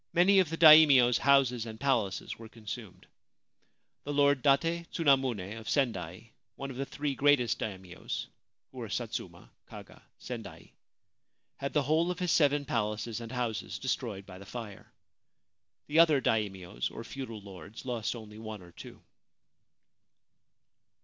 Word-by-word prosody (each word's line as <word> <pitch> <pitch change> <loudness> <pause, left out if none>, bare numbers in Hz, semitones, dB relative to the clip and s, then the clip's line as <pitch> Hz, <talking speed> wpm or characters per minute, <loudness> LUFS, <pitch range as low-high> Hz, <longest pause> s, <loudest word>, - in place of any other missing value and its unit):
Many 190 +3 +5
of 185 -5 +2
the 165 - -4
Daimios' 150 -6 +8
houses 130 -4 +3
and 110 0 -8
palaces 115 -10 -1
were 115 -1 -10
consumed. 110 -2 -9 1.0
The 145 - -4
Lord 145 -1 +3
Date 165 +5 +2
Tsunamune 130 - +1
of 110 - -8
Sendai, 110 - -2 0.2
one 135 0 -6
of 125 - -9
the 135 +1 -3
three 145 -1 -3
greatest 135 -3 +2
Daimios 95 -4 -5 0.5
(who - - -10
were - - -6
Satsuma, - - -5 0.2
Kaga, - - -12 0.2
Sendai), 105 -9 -9 0.9
had 140 - -4
the 150 - +2
whole 160 +5 +2
of 180 - -3
his 180 -2 -1
seven 145 -2 +3
palaces 110 -1 -2
and 115 - -8
houses 120 -4 -3
destroyed 115 -7 -3
by 95 -1 -11
the - - -10
fire; 110 -5 -9 0.9
the 155 +2 +1
other 160 -4 +6
Daimios 100 -7 -2
or 115 - -8
feudal 115 -3 -7
Jords 100 +2 -11
lost 120 -2 -2
only 110 -2 -10
one 110 -3 -8
or 85 - -15
two. - - -12
120 Hz, 145 wpm, -30 LUFS, 105-140 Hz, 1.0 s, Daimios